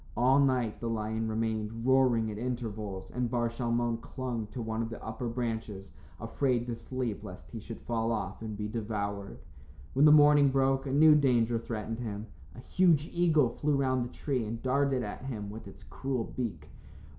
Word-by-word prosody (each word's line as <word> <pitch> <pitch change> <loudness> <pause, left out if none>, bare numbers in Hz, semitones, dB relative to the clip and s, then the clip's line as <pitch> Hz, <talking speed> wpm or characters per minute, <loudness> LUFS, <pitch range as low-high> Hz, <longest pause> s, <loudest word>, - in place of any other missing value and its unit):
All 130 +4 +5
night 130 -5 +1
the 115 - -3
lion 110 0 -2
remained, 110 0 -2
roaring 125 -4 +3
at 105 - -6
intervals, 110 -6 -4
and 125 -1 -1
Bar 120 0 0
Shalmon 120 -1 -1
clung 125 -5 -4
to 105 - -8
one 110 -1 -2
of 115 - -3
the 115 - -8
upper 110 +2 -4
branches 110 -5 -4 0.3
afraid 125 -4 0
to 120 - -3
sleep 120 -4 -4
lest 100 -2 -10
he 115 - -6
should 115 +1 -8
fall 115 -1 -1
off 110 - -3
and 110 -2 -5
be 105 0 -3
devoured. 105 -2 -4 0.6
When 140 +3 +5
morning 150 -1 +7
broke, 135 0 +1
a - - -2
new 155 +3 +7
danger 120 -5 +3
threatened 115 0 -4
him. 105 -3 -4 0.3
A - - -10
huge 160 +2 +2
eagle 160 -7 +3
flew 145 +5 0
round 130 -2 +1
the 120 - -5
tree 130 -3 -2
and 110 +2 -4
darted 135 -1 +1
at 105 +5 -6
him 105 -6 -5
with 110 +2 -9
its - - -13
cruel 130 -3 -3
beak. 100 -13 -5
120 Hz, 180 wpm, -30 LUFS, 110-130 Hz, 0.6 s, morning